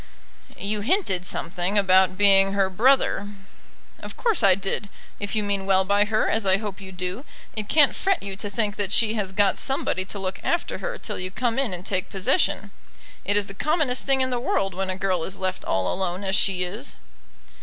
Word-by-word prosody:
"You 205 Hz, +1 st, -3 dB
hinted 205 Hz, -, 0 dB
something 180 Hz, +4 st, -1 dB
about 190 Hz, -1 st, +4 dB
being 195 Hz, -1 st, +5 dB
her 195 Hz, -1 st, +1 dB
brother." 235 Hz, -1 st, +2 dB, 0.7 s
"Of -, -, -10 dB
course 460 Hz, -, +2 dB
I 195 Hz, -3 st, +5 dB
did. 195 Hz, +1 st, -2 dB, 0.3 s
If 205 Hz, +1 st, -4 dB
you 215 Hz, -, +1 dB
mean 200 Hz, -1 st, -2 dB
well 190 Hz, -1 st, +3 dB
by 200 Hz, +1 st, +3 dB
her, 215 Hz, +1 st, 0 dB
as 220 Hz, -, 0 dB
I 190 Hz, 0 st, +4 dB
hope 205 Hz, -1 st, -6 dB
you 190 Hz, -1 st, -9 dB
do, 185 Hz, +6 st, -5 dB, 0.3 s
it 215 Hz, -2 st, -4 dB
can't 295 Hz, -3 st, +5 dB
fret 390 Hz, -, 0 dB
you 195 Hz, -1 st, -5 dB
to 205 Hz, +1 st, -6 dB
think 205 Hz, 0 st, -2 dB
that 200 Hz, -2 st, -1 dB
she 220 Hz, -1 st, +4 dB
has 205 Hz, -4 st, -2 dB
got 200 Hz, 0 st, +2 dB
somebody 265 Hz, -8 st, 0 dB
to 200 Hz, -, -7 dB
look 190 Hz, -1 st, -4 dB
after 340 Hz, -, -1 dB
her -, -, -4 dB
till -, -, -5 dB
you 185 Hz, 0 st, -3 dB
come 240 Hz, +5 st, -1 dB
in 270 Hz, -6 st, +1 dB
and 180 Hz, 0 st, -4 dB
take 185 Hz, -2 st, -2 dB
possession. 195 Hz, +1 st, 0 dB, 0.5 s
It 205 Hz, +1 st, +3 dB
is 205 Hz, -, +3 dB
the 195 Hz, -, -10 dB
commonest 290 Hz, -, 0 dB
thing 270 Hz, -1 st, +3 dB
in 260 Hz, 0 st, +1 dB
the 245 Hz, -, -1 dB
world 195 Hz, -5 st, -1 dB
when 190 Hz, +1 st, -3 dB
a 185 Hz, -, -2 dB
girl 185 Hz, -3 st, -1 dB
is 190 Hz, +3 st, -3 dB
left 185 Hz, -1 st, -3 dB
all 95 Hz, -1 st, 0 dB
alone 185 Hz, 0 st, -3 dB
as 195 Hz, 0 st, 0 dB
she 190 Hz, -2 st, +2 dB
is." 210 Hz, +10 st, -5 dB
200 Hz, 210 wpm, -24 LUFS, 190-220 Hz, 0.7 s, being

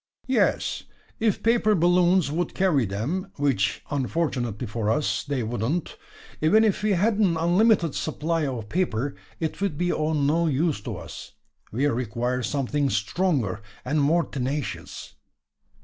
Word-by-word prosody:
"Yes, -, -, +1 dB, 0.3 s
if 220 Hz, -3 st, +1 dB
paper 225 Hz, -2 st, +3 dB
balloons 175 Hz, -1 st, +3 dB
would 170 Hz, +2 st, -2 dB
carry 155 Hz, -, +2 dB
them; 140 Hz, -, -2 dB
which, 135 Hz, -9 st, 0 dB
unfortunately 130 Hz, -5 st, -1 dB
for 105 Hz, -1 st, -2 dB
us, 150 Hz, +6 st, 0 dB
they 140 Hz, -4 st, -2 dB
wouldn't. 120 Hz, +9 st, -2 dB, 0.5 s
Even 210 Hz, +8 st, +5 dB
if 210 Hz, -4 st, +1 dB
we 210 Hz, -1 st, +2 dB
had 205 Hz, +4 st, +2 dB
an 180 Hz, -6 st, +3 dB
unlimited 175 Hz, 0 st, +3 dB
supply 160 Hz, 0 st, -1 dB
of 120 Hz, -5 st, -4 dB
paper, 140 Hz, -, -1 dB, 0.3 s
it 160 Hz, +3 st, -3 dB
would 195 Hz, -7 st, -1 dB
be 175 Hz, +1 st, +1 dB
of 155 Hz, +1 st, 0 dB
no 155 Hz, +4 st, +2 dB
use 150 Hz, -4 st, 0 dB
to -, -, -5 dB
us. -, -, -9 dB, 0.4 s
We 130 Hz, +6 st, 0 dB
require 125 Hz, -1 st, -1 dB
something 140 Hz, +2 st, 0 dB
stronger, 115 Hz, -, 0 dB, 0.2 s
and 145 Hz, +4 st, +1 dB
more 165 Hz, +4 st, +3 dB
tenacious." 135 Hz, +1 st, -4 dB
150 Hz, 140 wpm, -25 LUFS, 125-175 Hz, 0.5 s, Even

